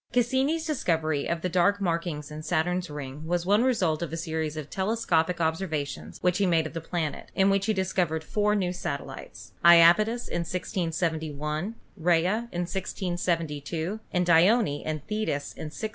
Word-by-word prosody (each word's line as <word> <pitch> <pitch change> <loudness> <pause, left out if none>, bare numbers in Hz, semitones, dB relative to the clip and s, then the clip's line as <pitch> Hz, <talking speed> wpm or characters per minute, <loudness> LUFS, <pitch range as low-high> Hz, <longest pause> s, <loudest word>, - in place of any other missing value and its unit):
Cassini's 265 +7 +1
discovery 160 - 0
of 170 -1 -1
the - - +1
dark 185 +3 +2
markings 165 -5 -2
in 155 0 -6
Saturn's 175 +2 0
ring 145 +1 -7
was 175 0 0
one 205 +5 +4
result 185 -12 +1
of 170 - -3
a 165 - -3
series 160 -1 -3
of 150 -2 -5
telescopic 180 -4 0
observations 160 -3 -2
which 180 +1 +2
he 200 - +3
made 165 -2 +3
of 155 - -6
the 165 - -4
planet, 165 -2 -3
in 195 +1 +4
which 195 +1 +1
he 220 - +3
discovered 180 -4 0
four 210 +4 +1
new 180 -3 0
satellites 145 -6 -6
— - - -32
Japetus 175 +8 +6
in - - -2
1671, 165 0 -2 0.2
Rhea 175 +1 +2 0.2
in 175 - -2
1672, 175 -1 -2
and 180 -1 +1
Dione 175 -1 +4
and 155 -1 -3
Thetis 210 -9 -2
in - - -7
1684. 155 +8 -4
175 Hz, 165 wpm, -27 LUFS, 160-195 Hz, 0.2 s, Japetus